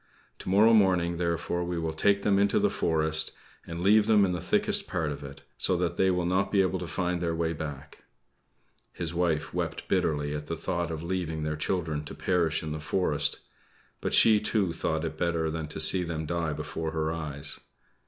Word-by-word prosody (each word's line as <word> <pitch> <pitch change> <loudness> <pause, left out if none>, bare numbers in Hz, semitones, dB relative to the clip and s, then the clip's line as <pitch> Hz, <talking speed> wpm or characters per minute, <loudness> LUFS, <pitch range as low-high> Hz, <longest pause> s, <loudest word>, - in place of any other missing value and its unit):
To - - -6
morrow 105 +4 +5
morning, 90 -5 +3
therefore, 85 0 -1
we 85 0 -3
will 80 -1 -2
take 100 +5 +2
them 100 -1 +3
into 100 0 +2
the - - +2
forest 80 -1 0 0.3
and 85 +1 -5
leave 105 +2 +5
them 105 -3 +5
in 90 - -1
the 90 -2 -3
thickest 205 - +1
part 80 -5 -2
of 70 - -7
it, 70 0 -10 0.2
so 90 - +3
that 85 -1 -1
they 95 +2 +3
will 90 -1 0
not 95 +3 +1
be 100 -2 +4
able 95 0 -1
to 90 - -5
find 90 +2 -2
their 85 -1 -1
way 80 0 -1
back." 75 -2 -8 0.9
His 85 -1 -4
wife 85 -3 0
wept - - -3
bitterly 75 -2 0
at 75 0 -5
the 85 - -3
thought 85 +1 -2
of 80 -1 -5
leaving 85 -3 -3
their 75 0 -2
children 80 -2 -2
to - - -8
perish 85 -4 0
in 80 - -4
the 75 - -4
forest; 75 -2 0 0.6
but - - -2
she, 110 -2 +6
too, 105 -4 0
thought 80 0 -1
it 80 -1 -6
better 85 -2 0
than 80 -1 -4
to 75 - -6
see 85 +4 +6
them 80 -2 -3
die 85 -1 -2
before 80 +2 -4
her 80 -1 -1
eyes. 75 -3 -2
85 Hz, 205 wpm, -28 LUFS, 80-90 Hz, 0.9 s, she